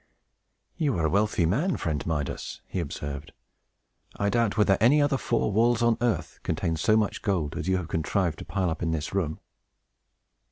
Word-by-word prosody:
"You 145 - +1
are 80 - +1
a 80 - +1
wealthy 100 -3 +2
man, 145 - +1
friend 80 -3 -2
Midas!" 75 -4 -3
he 95 - -3
observed. 75 -1 -5 0.8
"I 100 - 0
doubt 115 -3 +1
whether 105 -2 +4
any 130 +7 +6
other 145 -1 +3
four 115 -4 0
walls, 120 +3 +3
on 115 -1 +3
earth, 120 -3 -1
contain 80 +1 -1
so 110 +7 +3
much 105 -2 0
gold 85 -8 -1
as - - -4
you 95 0 +2
have 90 -3 -4
contrived 80 +1 -1
to - - -8
pile 95 -4 -1
up 80 - -5
in 85 - 0
this 80 0 -2
room." 85 -6 -1
95 Hz, 185 wpm, -27 LUFS, 80-115 Hz, 0.8 s, any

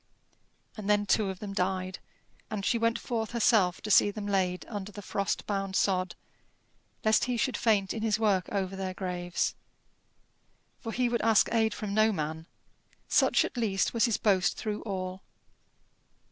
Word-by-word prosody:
And 210 -2 -5
then 205 0 +3
two 205 -1 +2
of 190 - -5
them 200 0 -6
died, 185 0 -2 0.5
and 210 -3 -4
she 235 - +2
went 230 0 +2
forth 230 -1 -3
herself 215 -6 +3
to 215 - -4
see 205 - +6
them 205 0 -6
laid 185 -3 0
under 205 -2 -6
the 205 0 -9
frost 200 +1 -2
bound 195 -2 -2
sod, 185 -2 +1 0.9
lest 215 0 +4
he 250 -1 -1
should 260 +2 0
faint 205 -4 +2
in 225 - -4
his 215 -2 +1
work 200 -5 +1
over 195 -2 -2
their 190 -1 -4
graves. 180 -2 -2 1.3
For 225 - -5
he 250 +2 +1
would 235 -1 0
ask 220 -1 +4
aid 220 -2 +2
from 210 -2 -4
no 215 +1 +4
man 160 -2 -4 0.6
such - - +3
at - - -7
least 210 -5 0
was 230 +1 +3
his 230 -4 +1
boast 190 -4 +2
through 210 -1 -3
all. 185 -1 -4
205 Hz, 170 wpm, -29 LUFS, 190-220 Hz, 1.3 s, see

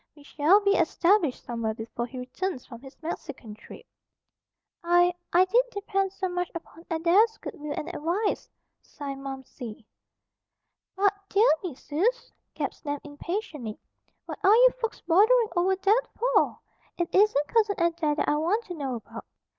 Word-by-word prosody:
We 295 - -16
shall 305 +7 +4
be 400 -1 +3
established 360 -6 +2
somewhere 230 -2 -3
before 230 +2 -5
he 260 - -10
returns 255 +4 -4
from 235 -3 -11
his 270 0 -13
Mexican 285 -8 -6
trip." 210 - -13 1.0
"I, 350 +1 +4 0.2
I 360 +2 +5
did 470 +7 +4
depend 390 -2 -1
so 385 0 -3
much 355 -1 -2
upon 330 0 -9
Adair's 365 +7 +3
good - - -7
will 295 0 -6
and 305 - -4
advice," 360 +5 -2 0.3
signed 275 -1 -7
Momsey. 265 -5 -8 1.1
"But, 400 +1 +3 0.2
dear 420 +4 +4 0.2
me 345 -8 -4
suz!" 395 - -1 0.2
gasped - - -4
Nan 290 -2 -3
impatiently. 295 - -5 0.5
"What - - -7
are 400 +3 +7
you - - +7
folks 455 - -3
bothering 430 +7 +4
over 365 +2 +2
that 415 +6 +2
for? - - +2 0.4
It 345 -1 -2
isn't 380 -8 +4
Cousin 430 -3 +2
Adair 335 -3 +1
that 295 - -1
I 295 - +2
want 385 +9 0
to 360 - -6
know 275 -6 -3
about. 230 - -9
345 Hz, 155 wpm, -27 LUFS, 285-400 Hz, 1.1 s, are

